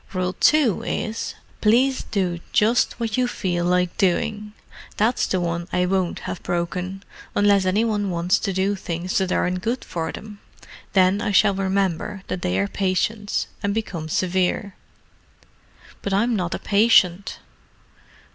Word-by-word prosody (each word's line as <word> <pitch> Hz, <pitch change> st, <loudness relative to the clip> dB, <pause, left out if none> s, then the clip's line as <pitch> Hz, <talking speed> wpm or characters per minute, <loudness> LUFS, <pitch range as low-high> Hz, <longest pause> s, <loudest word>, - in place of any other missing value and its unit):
Rule 185 Hz, -1 st, -1 dB
2 290 Hz, -6 st, +3 dB
is, 220 Hz, +1 st, -3 dB, 0.3 s
'Please 255 Hz, +5 st, +3 dB
do 180 Hz, -4 st, -2 dB
just 225 Hz, +3 st, +2 dB
what 225 Hz, -1 st, -2 dB
you 250 Hz, -1 st, +2 dB
feel 175 Hz, -7 st, -2 dB
like 180 Hz, 0 st, +1 dB
doing.' 210 Hz, +3 st, 0 dB, 0.4 s
That's 225 Hz, +4 st, +2 dB
the 185 Hz, -, 0 dB
one 170 Hz, 0 st, -2 dB
I 180 Hz, 0 st, +1 dB
won't 185 Hz, -1 st, -1 dB
have 175 Hz, -, -5 dB
broken—unless 190 Hz, +3 st, -1 dB
any 200 Hz, +5 st, +2 dB
one 205 Hz, -3 st, 0 dB
wants 175 Hz, +2 st, +1 dB
to 200 Hz, -, -2 dB
do 190 Hz, +2 st, +1 dB
things 180 Hz, -1 st, -4 dB
that 190 Hz, -1 st, -1 dB
aren't 180 Hz, 0 st, 0 dB
good 235 Hz, +5 st, -2 dB
for 160 Hz, -1 st, -3 dB
them. 210 Hz, -1 st, -10 dB, 0.5 s
Then 190 Hz, +1 st, +4 dB
I 220 Hz, -3 st, -1 dB
shall 200 Hz, +1 st, +4 dB
remember 195 Hz, 0 st, -1 dB
that 180 Hz, -, -3 dB
they 90 Hz, +1 st, 0 dB
are 100 Hz, +1 st, +1 dB
patients, 200 Hz, -, -1 dB, 0.2 s
and 200 Hz, 0 st, -1 dB
become 170 Hz, -8 st, -4 dB
severe." 185 Hz, +4 st, 0 dB, 1.3 s
"But 200 Hz, -, -3 dB
I'm 230 Hz, +4 st, +2 dB
not 180 Hz, -3 st, -1 dB
a -, -, -3 dB
patient." 200 Hz, -3 st, +3 dB
195 Hz, 145 wpm, -23 LUFS, 180-210 Hz, 1.3 s, Then